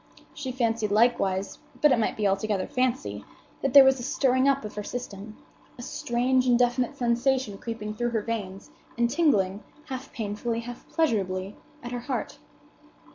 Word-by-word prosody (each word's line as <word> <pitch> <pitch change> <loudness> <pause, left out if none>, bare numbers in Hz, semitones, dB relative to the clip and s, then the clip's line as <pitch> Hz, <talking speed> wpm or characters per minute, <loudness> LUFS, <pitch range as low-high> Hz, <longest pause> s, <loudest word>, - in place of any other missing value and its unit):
She 265 -3 -5
fancied 230 -4 0
likewise, 200 -3 +1 0.2
but 300 - +5
it 240 - +4
might 220 - 0
be 210 -2 +2
altogether 195 0 0
fancy, 255 +1 -1 0.4
that 275 -1 -1
there 280 - +12
was 265 0 +4
a - - -6
stirring 260 -1 +2
up 275 -4 +1
of 210 - -7
her 210 - -4
system—a 215 +1 -9
strange, 255 -1 0
indefinite 245 +3 +2
sensation 240 -3 0
creeping 215 -2 -5
through 240 +2 -1
her 225 -3 -1
veins, 200 -4 -5 0.3
and 235 0 +2
tingling, 205 - +2 0.3
half 260 +1 -6
painfully, 225 +2 -3
half 240 +1 -10
pleasurably, 195 - 0 0.3
at 240 - -6
her 245 - -3
heart. 255 +1 -4
235 Hz, 155 wpm, -26 LUFS, 210-255 Hz, 0.4 s, there